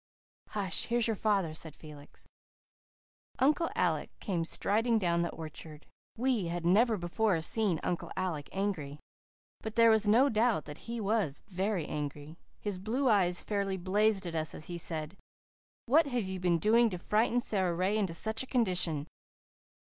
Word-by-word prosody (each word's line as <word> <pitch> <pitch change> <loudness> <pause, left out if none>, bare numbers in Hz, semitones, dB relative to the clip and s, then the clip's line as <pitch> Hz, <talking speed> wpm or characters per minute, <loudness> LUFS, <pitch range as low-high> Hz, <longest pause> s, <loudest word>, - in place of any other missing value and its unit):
"Hush, 195 -3 -1
here's 235 -1 +1
your 225 - +1
father," 195 -6 +1
said 155 -1 -7
Felix. 150 -2 -14 1.1
Uncle 295 +5 +2
Alec 160 -4 0
came 175 -5 -1
striding 225 +7 +1
down 170 -4 +1
the 170 - 0
orchard. 155 -1 -9 0.3
We 240 -6 +1
had 170 0 -3
never 220 +5 +4
before 180 +1 0
seen 200 -4 +1
Uncle 175 - -2
Alec 175 -6 -3
angry. 185 -8 -3 0.6
But 220 -1 -6
there 230 0 +6
was 220 -1 +3
no 235 +7 +5
doubt 225 - +1
that 150 0 -9
he 235 0 -3
was 200 -9 -1
very 190 -2 -1
angry. 150 +1 -5 0.2
His 205 -3 -4
blue 245 +7 0
eyes 180 -5 +3
fairly 200 -2 -1
blazed 195 +2 +1
at 170 - -4
us 160 -1 -1
as 155 - -9
he 175 -1 -6
said, 160 +1 -3 0.7
"What 295 +5 +4
have 245 -4 -1
you 190 0 -4
been 175 -1 +2
doing 225 +7 +4
to 180 - -4
frighten 220 +6 +1
Sara 190 -7 0
Ray 185 +4 +1
into 195 -6 0
such 220 +5 0
a 260 - -5
condition?" 180 - +1
190 Hz, 160 wpm, -31 LUFS, 170-220 Hz, 1.1 s, there